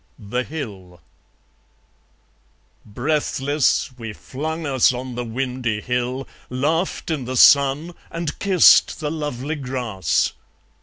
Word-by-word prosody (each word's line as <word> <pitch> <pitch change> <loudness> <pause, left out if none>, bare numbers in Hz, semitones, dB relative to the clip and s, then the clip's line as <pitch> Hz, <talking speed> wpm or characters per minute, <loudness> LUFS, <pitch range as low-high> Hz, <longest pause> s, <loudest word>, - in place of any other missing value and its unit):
The 125 +3 -3
Hill 100 - -8 1.9
Breathless, 145 +4 0
we 115 -2 -6
flung 160 +8 -5
us 135 -4 +3
on 125 0 -5
the 120 +1 -3
windy 125 -2 -2
hill, 125 +3 -2 0.2
Laughed 160 +8 -1
in 145 -6 -2
the 130 +1 -3
sun, 140 +6 +5 0.2
and 165 -2 -4
kissed 190 -4 +5
the 150 -2 -2
lovely 150 -2 -3
grass. 125 - -1
130 Hz, 105 wpm, -21 LUFS, 120-150 Hz, 1.9 s, sun